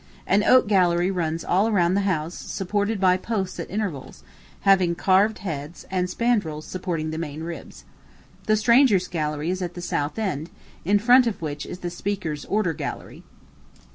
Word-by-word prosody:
An 200 +2 +3
oak 255 -1 +5
gallery 180 -2 +3
runs 165 -3 -2
all 200 +5 +2
round 180 -3 +2
the 200 - +2
house, 160 -1 -2
supported 205 +3 -2
by 185 -1 +4
posts 195 -2 -3
at - - -5
intervals, 190 -10 -5 0.4
having 185 -3 +4
carved 195 +5 +3
heads, 150 -1 -6
and 180 -1 0
spandrills 180 -9 -1
supporting 170 -4 -3
the 160 - -4
main 155 -1 -5
ribs. 170 0 -8 0.6
The 215 - +4
strangers' 220 -4 +4
gallery 150 0 -2
is 185 0 -3
at 175 -1 -4
the - - -6
south 150 -2 -2
end, 170 -7 -2 0.3
in 200 +4 +3
front 245 +4 +5
of 225 - -2
which 150 -2 -5
is 180 - -8
the 175 - -4
speaker's 175 -5 -4
order 200 -5 0
gallery. - - -6
180 Hz, 170 wpm, -24 LUFS, 165-205 Hz, 0.6 s, oak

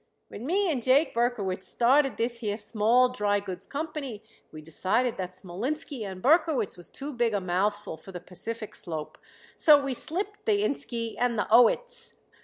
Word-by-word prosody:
When 235 +6 -7
me 380 +2 +2
and 265 -5 -1
Jake 265 +6 +3
Berkowitz 215 -6 -1
started 265 0 +3
this 235 +1 -1
here 210 -3 -2
Small 235 +4 +2
Drygoods 205 -4 -2
Company 280 -7 -5 0.3
we 155 - -9
decided 190 +10 0
that 185 -1 -4
Smolinski 240 - -4
and 190 -2 -7
Berkowitz 300 - +3
was 175 - -10
too 285 +1 -6
big 235 -3 +1
a - - +2
mouthful 190 0 -1
for 175 +5 -12
the 180 - -6
Pacific 215 +6 -6
Slope, 155 -3 -5 0.4
so 300 -2 +7
we 275 -2 -2
slipped 400 - -5
the 415 -1 +3
'inski' 235 - -2
and 245 -2 +1
the 210 - +1
'owitz.' 470 - +3
235 Hz, 165 wpm, -27 LUFS, 200-280 Hz, 0.4 s, so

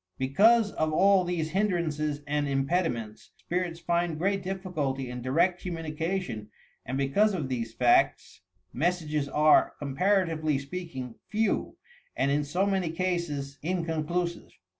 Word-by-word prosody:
Because 205 - +4
of 155 0 -1
all 195 +4 +4
these 170 -3 -2
hindrances 155 -7 0
and 145 0 0
impediments, 135 -6 -1
spirits 175 -1 -3
find 170 -1 0
great 195 +4 0
difficulty 160 -9 -3
in 125 0 -6
direct 170 +8 +1
commiinication 165 - -3 0.4
and 130 +2 -2
because 195 +10 +2
of 150 -7 -3
these 115 -3 -3
facts, 130 +3 +2 0.3
messages 155 -2 -1
are, 150 +2 +4
comparatively 155 0 +1
speak 165 +3 -7
ing, 125 -2 -5 0.2
few, 220 -1 0 0.4
and 140 - +1
in 145 +1 +2
so 175 +7 0
many 190 -4 0
cases 165 -5 -2
inconclusive. 170 0 -2
160 Hz, 125 wpm, -28 LUFS, 140-180 Hz, 0.4 s, Because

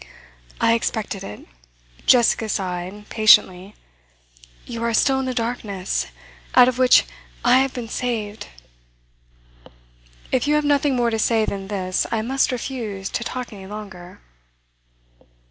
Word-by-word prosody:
'I 230 - +3
expected 215 -3 -2
it,' 105 - -9 0.6
Jessica 235 -2 +4
sighed 190 +1 -4
patiently. 200 -3 +4 0.9
'You 230 -1 -6
are 235 -1 0
still 265 +3 +3
in 265 - -2
the 255 - -2
darkness, 225 -5 -2 0.5
out 250 -1 +8
of 255 0 -1
which 255 -1 +6 0.4
I 245 +1 +6
have 270 0 +1
been 245 -3 -6
saved.' 220 -3 -4 1.8
'If 260 +2 +1
you 300 - +3
have 300 0 +1
nothing 285 -1 +2
more 240 -1 +1
to 225 - -1
say 220 0 +2
than 195 -2 -5
this, 185 -2 -1
I 220 -1 0
must 265 +3 +1
refuse 225 -6 -4
to 235 - -2
talk 250 0 -5
any 190 -2 -10
longer. 190 -4 -10
225 Hz, 135 wpm, -22 LUFS, 200-250 Hz, 1.8 s, out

